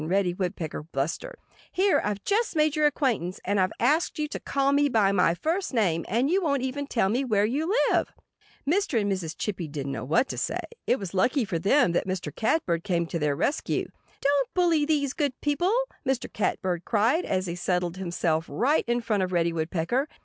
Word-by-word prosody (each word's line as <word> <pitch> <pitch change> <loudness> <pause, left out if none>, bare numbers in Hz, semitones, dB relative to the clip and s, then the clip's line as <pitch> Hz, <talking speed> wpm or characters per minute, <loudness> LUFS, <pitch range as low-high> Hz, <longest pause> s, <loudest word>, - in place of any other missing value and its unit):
Reddy 185 0 +1
Woodpecker 175 -4 -3
blustered. 160 - -3 0.4
"Here 385 +1 +3
I've 205 -1 -2
just 435 -1 0
made 305 -1 +2
your 305 -1 +4
acquaintance. 240 - -1
And 200 +1 +1
I've 185 0 +2
asked 300 +8 +2
you 305 -1 -1
to - - -5
call 275 0 0
me 285 0 +3
by 210 -5 +3
my 180 -3 +3
first 330 - -2
name. 175 -7 +1
And 235 +6 +1
you 370 +6 +2
won't 280 -6 0
even 280 +2 -3
tell 225 -8 +1
me 240 +7 +1
where 210 -5 +2
you 295 - -1 0.2
live!" - - +1 0.6
Mr. 325 - +2
and 205 -1 0
Mrs. 180 -3 -3
Chippy 185 -6 -3
didn't 140 -2 -4
know 135 - -4
what 165 - +2
to - - -3
say. - - -2 0.3
It - - +3
was 195 -6 -6
lucky 250 +7 +2
for 170 -4 -2
them 195 - +3
that 175 - 0
Mr. 185 -5 -4
Catbird 185 - 0
came 175 -4 0
to 165 0 -3
their 150 -2 +1
rescue. 280 - -1 0.3
"Don't 280 -2 +1
bully 340 -5 +3
these 290 -3 +1
good 285 -5 -2
people!" 300 +6 +1 0.3
Mr. 265 -3 -2
Catbird 180 -4 -1
cried, 235 - +2
as 185 -1 -1
he 170 - -3
settled 180 0 -1
himself 170 -3 -1
right 255 - +1
in 240 0 +1
front 215 -4 0
of 185 -1 -1
Reddy 170 -1 +1
Woodpecker. 170 - -1
210 Hz, 200 wpm, -26 LUFS, 175-285 Hz, 0.6 s, your